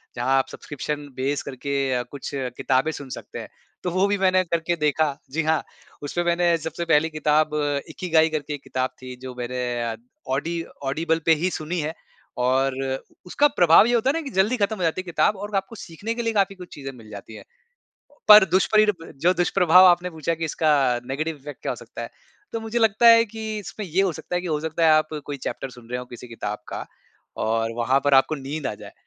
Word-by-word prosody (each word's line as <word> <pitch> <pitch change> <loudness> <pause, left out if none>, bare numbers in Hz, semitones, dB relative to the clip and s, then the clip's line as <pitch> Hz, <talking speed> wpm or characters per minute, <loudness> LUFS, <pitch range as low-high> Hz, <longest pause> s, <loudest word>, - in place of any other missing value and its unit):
जहाँ 130 +3 +1
आप 135 - +1
subscription 145 0 -5
base 140 +2 -1
करके 135 -2 -2
कुछ 140 +4 -8
किताबें 130 +3 0
सुन 140 -3 -8
सकते - - -8
हैं, - - -8 0.3
तो 180 - -1
वो 185 +3 +2
भी 205 0 +1
मैंने 185 -1 +3
करके 170 0 -1
देखा। 150 -1 +1 0.2
जी 160 +2 0
हाँ 160 0 +1 0.4
उसपे 175 +4 -2
मैंने 170 0 +2
सबसे 160 +2 -5
पहली 160 0 +3
किताब 155 0 +1 0.4
इकिगाई 160 -3 +2
करके 150 -1 -3
एक 145 - -7
किताब 130 0 -2
थी, 130 0 -8
जो 130 -1 -7
मैंने 120 -2 -3 0.4
ऑडी 165 +4 -2 0.2
ऑडिबल 160 +4 0
पे 165 - +6
ही 185 - +3
सुनी 165 +3 -3
है। 155 +1 -2 0.5
और 130 +1 +2 0.5
उसका 290 +11 +3
प्रभाव 175 +4 +7
ये 240 - +1
होता 235 +3 +2
है - - +2
ना, 330 - -1
कि 280 - -6
जल्दी 205 +7 +2
खत्म 210 +1 0
हो 180 - -3
जाती 165 +3 0
है - - -15
किताब 175 +3 +1
और 205 +1 -5
आपको 195 +3 -2
सीखने 200 +6 -5
के 240 - -2
लिए 225 -1 0
काफ़ी 195 -1 +1
कुछ 180 -1 -11
चीज़ें 135 -2 -7
मिल 110 -2 -14
जाती 105 +1 -10
हैं। - - -11 0.9
पर 210 -1 +11
दुष्परी 215 +3 +4
ब 180 -6 -3
जो 180 - +6
दुष्प्रभाव 180 0 +5
आपने 180 0 +4
पूछा 160 +1 -2
कि 165 0 -4
इसका 155 0 +1 0.4
नेगेटिव 155 +4 -3
इफेक्ट 145 +1 -10
क्या - - -1
हो - - -7
सकता - - -9
है। - - -5 0.4
तो 230 - -3
मुझे 225 +2 -2
लगता 225 +1 +3
है 230 0 +8
कि 220 -1 -5
इसमें 205 +1 -7
ये 180 +4 +1
हो 185 -3 +1
सकता 160 +3 -7
है - - 0
कि - - -5
हो 150 -1 0
सकता 160 +1 -1
है 155 - +6
आप 155 0 +3 0.2
कोई 145 -1 -4
चैप्टर 135 - -4
सुन 120 -1 -15
रहे 125 - -2
हो - - -7
किसी 120 0 -11
किताब 105 -2 -5
का - - -5 0.6
और 115 +1 0
वहाँ 130 +3 +2
पर 145 -1 +4
आपको 135 +4 +4
नींद 140 +1 -5
आ - - -2
जाए। 105 -1 -12
160 Hz, 220 wpm, -24 LUFS, 135-185 Hz, 0.9 s, पर